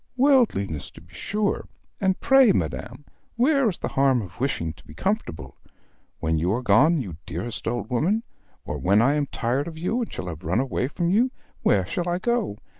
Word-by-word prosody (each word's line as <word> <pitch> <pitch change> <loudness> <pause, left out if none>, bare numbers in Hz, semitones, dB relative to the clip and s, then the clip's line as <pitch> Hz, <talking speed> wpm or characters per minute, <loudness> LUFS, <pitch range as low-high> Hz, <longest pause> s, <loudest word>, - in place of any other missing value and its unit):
Worldliness, 240 - +2
to - - -15
be 85 +2 -20
sure; 210 0 -2 0.3
and 190 -1 +1
pray, 270 -5 +6
madam, 145 - -3 0.3
where 265 0 +3
is 180 - -3
the - - -3
harm 135 -4 +2
of 90 +1 -12
wishing 85 - -1
to - - -19
be 75 - -14
comfortable? 80 - -3 0.6
When 80 0 0
you 85 +4 +1
are 125 +3 -2
gone, 155 +6 +5
you 90 -10 -7
dearest 100 +10 -5
old 120 +2 -2
woman, 185 - +1 0.4
or - - -4
when 100 +3 +3
I 130 +5 +4
am 150 -1 0
tired 130 +6 -1
of 165 -1 -7
you 200 +9 -1
and 230 - -4
have 80 -4 -6
run 90 +8 +1
away 130 -1 -1
from 170 +4 -1
you, 235 +6 +3 0.3
where 95 -3 +3
shall 175 - -2
I 175 - 0
go? 235 - -1
140 Hz, 190 wpm, -24 LUFS, -, 0.6 s, pray